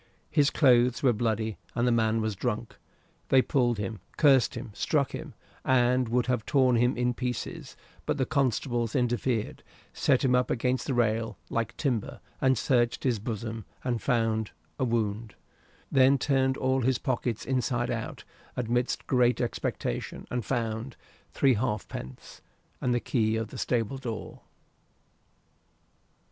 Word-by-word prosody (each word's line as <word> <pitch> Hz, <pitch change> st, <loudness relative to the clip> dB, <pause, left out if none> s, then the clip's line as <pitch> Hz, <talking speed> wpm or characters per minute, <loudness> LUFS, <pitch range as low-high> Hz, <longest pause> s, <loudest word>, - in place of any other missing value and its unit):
His 145 Hz, -2 st, +4 dB
clothes 125 Hz, -3 st, +4 dB
were 125 Hz, -3 st, +5 dB
bloody, 110 Hz, -1 st, -1 dB, 0.2 s
and 120 Hz, +1 st, +1 dB
the -, -, +3 dB
man 110 Hz, -1 st, +2 dB
was 110 Hz, -2 st, -1 dB
drunk. 115 Hz, +2 st, -3 dB, 0.5 s
They 130 Hz, -1 st, +5 dB
pulled 120 Hz, -4 st, +1 dB
him, 105 Hz, +1 st, -4 dB, 0.2 s
cursed 135 Hz, -4 st, +4 dB
him, 120 Hz, -1 st, -6 dB
struck 140 Hz, +5 st, 0 dB
him, -, -, -7 dB, 0.3 s
and 125 Hz, -1 st, +3 dB
would 125 Hz, +1 st, +2 dB
have 125 Hz, -3 st, 0 dB
torn 130 Hz, -2 st, +3 dB
him 120 Hz, +2 st, +2 dB
in 125 Hz, 0 st, +1 dB
pieces, 125 Hz, 0 st, -5 dB, 0.3 s
but -, -, 0 dB
the 130 Hz, -, +1 dB
constables 120 Hz, -4 st, 0 dB
interfered, 120 Hz, -2 st, 0 dB, 0.3 s
set 135 Hz, 0 st, +2 dB
him 125 Hz, -, +3 dB
up 125 Hz, 0 st, +2 dB
against 125 Hz, +2 st, 0 dB
the 135 Hz, -, 0 dB
rail, 115 Hz, -1 st, 0 dB
like 115 Hz, 0 st, -2 dB
timber, 120 Hz, -8 st, -2 dB, 0.2 s
and 130 Hz, -1 st, +3 dB
searched 120 Hz, 0 st, +1 dB
his 125 Hz, -5 st, +1 dB
bosom, 110 Hz, 0 st, -4 dB, 0.2 s
and 120 Hz, -3 st, -1 dB
found 115 Hz, -4 st, +1 dB, 0.3 s
a -, -, +1 dB
wound; 110 Hz, -2 st, -1 dB, 0.6 s
then 135 Hz, +1 st, +5 dB
turned 130 Hz, 0 st, +1 dB
all 130 Hz, 0 st, +1 dB
his 130 Hz, +1 st, +2 dB
pockets 120 Hz, -4 st, -2 dB
inside 125 Hz, -1 st, 0 dB
out, 115 Hz, -2 st, -4 dB, 0.3 s
amidst 120 Hz, +1 st, -1 dB
great 125 Hz, -1 st, +3 dB
expectation, 115 Hz, -, -3 dB
and 125 Hz, -1 st, -1 dB
found 115 Hz, 0 st, -2 dB, 0.4 s
three 135 Hz, -2 st, +3 dB
halfpence 105 Hz, -, -4 dB, 0.4 s
and 125 Hz, -, +1 dB
the 120 Hz, -, +2 dB
key 110 Hz, -3 st, 0 dB
of 110 Hz, -1 st, -2 dB
the -, -, -9 dB
stable 120 Hz, +2 st, -1 dB
door. 115 Hz, -5 st, -6 dB
120 Hz, 145 wpm, -28 LUFS, 115-130 Hz, 0.6 s, were